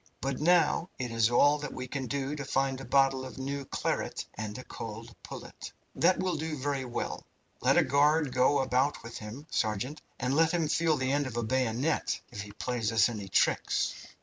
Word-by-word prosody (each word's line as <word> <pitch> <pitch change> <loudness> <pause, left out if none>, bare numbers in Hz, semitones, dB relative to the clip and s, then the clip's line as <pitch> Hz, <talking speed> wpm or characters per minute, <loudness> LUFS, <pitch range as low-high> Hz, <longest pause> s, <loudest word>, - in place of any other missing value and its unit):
but 135 -1 -2
now 170 +1 +3
it 125 -2 -3
is 115 0 +3
all 145 +5 +5
that 150 - -5
we 130 0 -5
can 130 0 -4
do 140 +2 -2
to 145 - -4
find 135 0 0
a - - -7
bottle 135 -1 +3
of 130 - -8
new 140 +1 -3
claret - - -2
and 105 -1 -5
a 130 - -7
cold 115 0 -8
pullet." - - -9 0.2
"That 170 +7 +3
will 185 -2 0
do 155 0 -3
very 140 -1 -2
well. 120 - -4 0.4
Let 135 +5 +4
a 175 - +6
guard 145 0 +3
go 130 +3 +4
about 130 +1 +1
with 115 +1 -7
him, 115 +7 -8
sergeant, 115 +7 -1 0.2
and 125 +1 0
let 165 +2 +4
him 165 -3 +1
feel 160 0 +2
the 130 0 0
end 145 0 +1
of 120 -2 -6
a 120 - 0
bayonet 130 +5 0
if 105 -4 -5
he 105 0 -8
plays 115 0 -2
us 110 0 +4
any 105 -4 -5
tricks." - - +2
135 Hz, 200 wpm, -30 LUFS, 120-145 Hz, 0.4 s, a